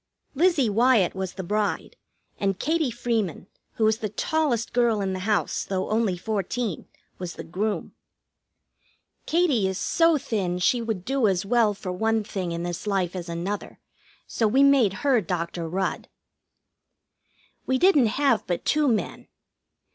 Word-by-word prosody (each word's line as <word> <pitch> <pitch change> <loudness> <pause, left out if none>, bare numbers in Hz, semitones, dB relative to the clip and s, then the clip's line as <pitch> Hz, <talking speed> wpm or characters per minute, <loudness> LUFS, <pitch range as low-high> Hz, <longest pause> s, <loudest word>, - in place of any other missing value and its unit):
Lizzie 315 -3 +3
Wyatt 225 -2 +3
was 190 -1 -4
the 190 - -6
bride, 210 +3 -2 0.4
and 195 -2 0
Katie 315 +1 0
Freeman, 225 -8 -2 0.3
who 220 - +1
is 220 +1 +2
the 215 - -3
tallest 250 0 -1
girl 235 -3 +2
in 195 -1 -1
the 185 - -4
house, 210 - 0
though 190 0 -3
only 215 -5 +1
fourteen, 210 0 -3 0.3
was 180 -2 -5
the - - -7
groom. 205 +5 -3 1.3
Katie 305 - +2
is 190 -1 -2
so 330 +6 +3
thin 195 -9 -2
she 235 +7 +2
would 220 -6 -3
do 270 -4 +2
as 190 0 0
well 220 -1 +2
for 185 -2 -5
one 220 +4 0
thing 185 -4 -4
in 170 0 -3
this 175 +3 -5
life 190 -3 0
as 175 -1 -5
another, 175 +5 -4 0.5
so 225 - 0
we 265 +6 +4
made 275 -7 +5
her 260 -5 +4
Dr. 170 -2 -3
Rudd. 190 +3 -2 1.6
We 260 - +2
didn't 300 -7 +5
have 275 -6 +2
but 175 - -2
two 300 -1 +2
men. 225 -5 -1
215 Hz, 155 wpm, -25 LUFS, 185-245 Hz, 1.6 s, made